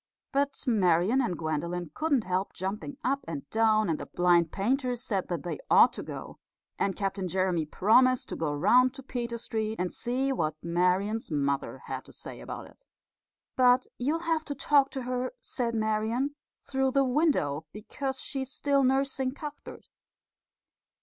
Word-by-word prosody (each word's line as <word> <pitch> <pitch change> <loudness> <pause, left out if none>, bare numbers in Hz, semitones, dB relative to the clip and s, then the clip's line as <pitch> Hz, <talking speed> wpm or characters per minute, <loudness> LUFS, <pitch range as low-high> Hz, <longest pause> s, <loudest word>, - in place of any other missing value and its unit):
But 280 0 0
Marian 200 +1 +3
and 205 -9 -1
Gwendolen 165 +1 -3
couldn't 290 -7 +1
help 185 +1 -1
jumping 210 +9 -4
up 275 +2 0
and 145 -4 -5
down, 215 -1 +3
and 160 -2 0
the - - -6
blind 175 -2 +3
painter 250 +5 0
said 205 -5 -1
that 170 -5 -3
they 175 - -4
ought - - +7
to - - -6
go, - - -8 0.4
and 195 -2 +1
Captain 195 -1 -2
Jeremy 180 -3 0
promised 250 +9 +4
to - - -4
go 160 -2 -1
round 245 - +4
to 270 - -9
Peter 235 -2 -4
Street 220 -1 -2
and 180 0 -1
see 255 +3 -1
what 155 - -1
Marian's 180 +6 +1
mother 140 -2 -1
had - - -5
to - - -14
say - - -7
about - - -7
it. - - -21 0.7
"But 250 0 +5
you'll 300 +7 0
have 325 -2 +1
to 285 - -4
talk 280 0 +3
to 265 - -5
her," 250 - -2
said 235 -3 -3
Marian, 220 +5 0 0.3
"through 265 0 0
the 275 -1 +4
window, 250 - +1
because 265 +5 -5
she's 265 -2 -4
still 280 0 +2
nursing 265 0 +1
Cuthbert." 295 0 -9
230 Hz, 165 wpm, -29 LUFS, 180-265 Hz, 0.7 s, ought